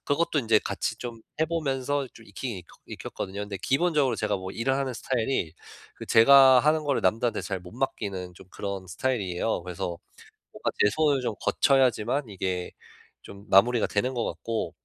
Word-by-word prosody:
그것도 160 +1 +1
인제 110 -2 +4
같이 - - -2
좀 120 -2 -7 0.2
해 160 - +3
보면서 145 -3 -1
좀 115 - -15
익히긴 100 -1 -6 0.2
익혔거든요. 100 +2 -6
근데 100 -1 -5
기본적으로 150 -2 +2
제가 105 -1 0
뭐 95 0 -6
일을 135 +4 0
하는 135 -2 -2
스타일이 115 -9 -1 0.4
그 - - -8 0.4
제가 130 -1 +7
하는 155 +2 +2
거를 140 -2 +1
남들한테 115 +5 +1
잘 95 -3 -4
못 90 0 -12
맡기는 100 -8 -3
좀 90 - -15
그런 100 -2 -5
스타일이에요. 100 -4 -1
그래서 90 -1 -4 0.6
뭔가 - - -2
제 105 - +5
손을 145 +1 +2
좀 115 - -2
거쳐야지만 130 -1 +2
이게 95 -2 -3 0.5
좀 100 +1 -12
마무리가 115 +4 +5
되는 125 +6 -1
것 120 - -1
같고 115 -1 -3
115 Hz, 365 characters per minute, -26 LUFS, 100-135 Hz, 0.6 s, 제가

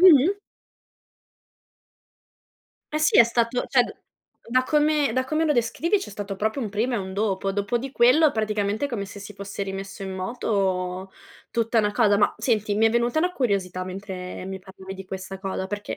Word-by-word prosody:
Mh-mh. 360 +1 +7 2.6
Eh 305 - +1
sì, 310 - +4
è 235 - +10
stato 235 +1 0
cioè, 255 -2 +5
d - - -7 0.5
da 255 +2 +3
come 300 -3 +2
da 260 +1 +1
come 310 +4 0
lo 300 - +3
descrivi 300 - +1
c'è - - -7
stato 200 -1 -5
proprio 220 +6 -1
un 220 - -2
prima 225 +5 -1
e - - +1
un 190 -1 -5
dopo. 195 -1 0
Dopo 205 +4 0
di 270 +3 -5
quello, 275 +5 +5
praticamente, 215 +2 -1
come 235 -7 -3
se 200 +1 -10
si 205 +1 -9
fosse 200 0 -5
rimesso 195 0 -6
in 190 - -5
moto 190 -2 -1 0.4
tutta 230 -1 +2
una 210 - +1
cosa. 205 -2 +3
Ma 205 - +3
senti, 215 -3 +1
mi 220 +1 +5
è - - +3
venuta 235 +4 +1
una 360 +3 +1
curiosità 195 - -1
mentre 185 -1 -6
mi 190 0 -6
parlavi 190 0 -10
di 190 - -8
questa 190 0 -7
cosa, 190 -1 -3
perché 205 +1 -5
210 Hz, 185 wpm, -25 LUFS, 195-245 Hz, 2.6 s, è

